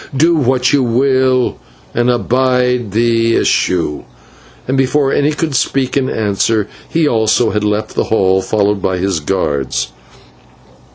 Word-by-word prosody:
Do 165 +5 +4
what 130 -4 +1
you 140 - +3
will, 130 +1 +1 0.4
and 120 +1 +1
abide 125 -1 +1
the 115 +1 +1
issue" 85 -5 0 0.7
and 130 - 0
before 135 +1 +1
any 145 +1 +2
could 155 0 -3
speak 130 0 0
in 135 -2 0
answer, 105 0 0 0.2
he 165 -2 +1
also 110 -1 +1
had 105 0 -1
left 105 +1 -2
the - - -1
hall, 95 -3 +2
followed 100 0 0
by 95 0 -1
his 95 -2 -1
guards. 70 -7 -2
120 Hz, 135 wpm, -15 LUFS, 100-130 Hz, 0.7 s, Do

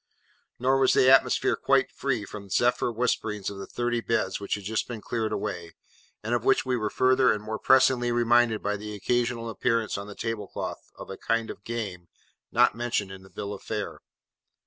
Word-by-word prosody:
Nor 130 +2 +2
was 130 - +4
the 130 - +5
atmosphere 135 - +4
quite - - +2
free 125 -6 -2
from 100 0 -9
zephyr 120 +4 +2
whisperings 110 -4 -1
of 100 - -8
the 95 - -7
thirty 120 -1 -1
beds 95 -5 -1
which 100 - -2
had 100 - -8
just 110 +3 -2
been 120 -3 -6
cleared 110 0 -2
away, 90 -5 -4 0.5
and 115 +3 -2
of 120 -2 0
which 135 +2 +3
we 130 -1 0
were 110 -3 -1
further 130 +2 +3
and 105 0 -2
more 110 0 -4
pressingly 130 -2 +4
reminded 120 -1 +3
by 105 0 -1
the 105 +1 -7
occasional 120 +2 -1
appearance 115 -2 0
on 100 - -7
the 105 - -9
table 115 -3 -4
cloth - - -6
of - - -9
a 95 - -7
kind 115 0 -1
of - - -12
Game, 100 -7 -5 0.4
not - - +4
mentioned 115 -4 -2
in 95 0 -9
the 95 - -16
Bill 100 +1 -5
of 100 - -9
Fare. 105 -2 -4
115 Hz, 200 wpm, -27 LUFS, 105-120 Hz, 0.5 s, the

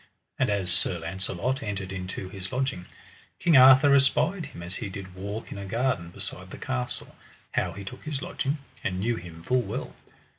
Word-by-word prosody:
And - - +3
as 100 -3 +1
Sir 90 0 +1
Launcelot 95 - -2
entered 100 -4 -3
into 95 0 -4
his 95 0 -6
lodging, 130 -9 -1 0.5
King 170 -3 +4
Arthur 130 +2 +9
espied 155 +5 +3
him 85 - -9
as 90 +2 -3
he 100 +1 -4
did 95 -1 -7
walk 100 +4 -5
in 100 - -5
a 100 - -5
garden 115 -5 0
beside - - -6
the - - -8
castle, 60 0 -3 0.4
how - - 0
he 100 - -7
took 125 +6 -8
his 150 -3 -2
lodging, 140 +1 -1 0.3
and 90 -1 -1
knew 115 +4 +1
him 85 -1 -9
full 125 +5 +3
well. 100 - -4
100 Hz, 185 wpm, -28 LUFS, 95-130 Hz, 0.5 s, Arthur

